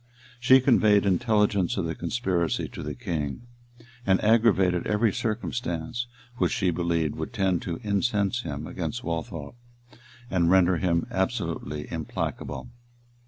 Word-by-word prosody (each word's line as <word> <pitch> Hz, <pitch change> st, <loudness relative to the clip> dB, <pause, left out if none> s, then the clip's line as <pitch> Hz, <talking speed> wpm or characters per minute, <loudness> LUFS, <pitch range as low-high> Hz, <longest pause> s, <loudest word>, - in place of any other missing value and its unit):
She 130 Hz, +2 st, +6 dB
conveyed 110 Hz, -6 st, +4 dB
intelligence 105 Hz, -1 st, +2 dB
of 95 Hz, -, 0 dB
the 80 Hz, -, -2 dB
conspiracy 85 Hz, -3 st, -1 dB
to -, -, -8 dB
the -, -, -5 dB
king, 80 Hz, -, -3 dB, 0.6 s
and 95 Hz, -3 st, +3 dB
aggravated 105 Hz, -6 st, +3 dB
every 105 Hz, 0 st, +2 dB
circumstance 115 Hz, -1 st, -3 dB, 0.3 s
which -, -, +1 dB
she 95 Hz, -4 st, +1 dB
believed 85 Hz, -3 st, 0 dB
would -, -, -5 dB
tend 95 Hz, -3 st, +1 dB
to 85 Hz, -2 st, -4 dB
incense 105 Hz, +1 st, +1 dB
him 75 Hz, -6 st, -5 dB
against 90 Hz, +9 st, -4 dB
Waltheof, 80 Hz, -3 st, -4 dB, 0.8 s
and 85 Hz, -3 st, +2 dB
render 95 Hz, -1 st, +5 dB
him 85 Hz, -1 st, +1 dB
absolutely 75 Hz, +2 st, -2 dB
implacable. -, -, -4 dB
95 Hz, 125 wpm, -26 LUFS, 85-110 Hz, 0.8 s, She